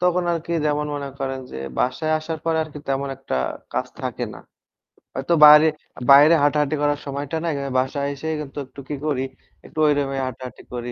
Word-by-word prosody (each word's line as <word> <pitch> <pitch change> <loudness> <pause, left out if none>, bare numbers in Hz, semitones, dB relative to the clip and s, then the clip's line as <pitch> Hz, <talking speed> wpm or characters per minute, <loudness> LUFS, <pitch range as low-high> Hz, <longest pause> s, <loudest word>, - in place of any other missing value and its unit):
তখন 180 0 +2
আরকি 170 0 -3
যেমন 150 0 0
মনে 140 -1 -4
করেন 135 -1 -3
যে - - -6 0.2
বাসায় 155 +5 0
আসার 160 +1 -5
পরে 165 -1 +1
আরকি 150 -1 -10
তেমন 135 +1 -1
একটা 135 - -4 0.4
কাজ - - -1
থাকে - - -3
না। - - -11 0.8
হয়তো 135 +6 0
বাইরে, 150 +1 +9 0.4
বাইরে 145 +4 +8
হাঁটাহাঁটি 150 +1 +2
করার 145 0 +1
সময়টা 140 +3 -3
নাই। 165 - 0
আমি 140 -1 -4
বাসায় 140 +2 -1
এসে 140 +3 -7
কিন্তু 145 -1 -9
একটু 135 +2 -14
কি 150 - -2
করি 140 -4 0 0.4
একটু 155 - -8
ওই 145 - +5
রুমে 135 -1 -1
হাঁটাহাঁটি 130 0 -8
করি। 120 0 -4
145 Hz, 185 wpm, -22 LUFS, 135-155 Hz, 0.8 s, বাইরে